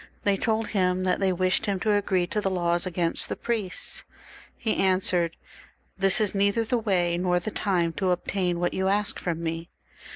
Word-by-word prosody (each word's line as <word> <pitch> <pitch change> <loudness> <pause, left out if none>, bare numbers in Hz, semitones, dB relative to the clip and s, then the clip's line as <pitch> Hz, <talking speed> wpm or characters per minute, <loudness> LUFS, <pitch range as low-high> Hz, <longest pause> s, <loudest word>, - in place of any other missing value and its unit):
They 200 -1 +3
told 220 +2 -1
him 185 -2 +1
that 185 -1 +1
they 195 -1 +2
wished 185 +3 +1
him 195 -2 0
to 215 +1 +2
agree 195 -3 +1
to 210 +4 -2
the 195 - 0
laws 175 -1 0
against 170 -2 0
the - - -2
priests. 220 -6 -3 0.5
He 220 -2 -1
answered, 185 -3 +2 0.3
" - - -36
This 195 -1 +3
is 210 -3 +1
neither 200 +3 +2
the 235 +2 0
way 175 -5 +1
nor 180 -1 +2
the 195 +5 -5
time 175 -6 0
to 190 -2 +1
obtain 180 -1 0
what 175 0 0
you 190 0 0
ask 205 +1 +1
fix)m 170 -2 -1
me." 165 0 -4
185 Hz, 195 wpm, -26 LUFS, 175-205 Hz, 0.5 s, They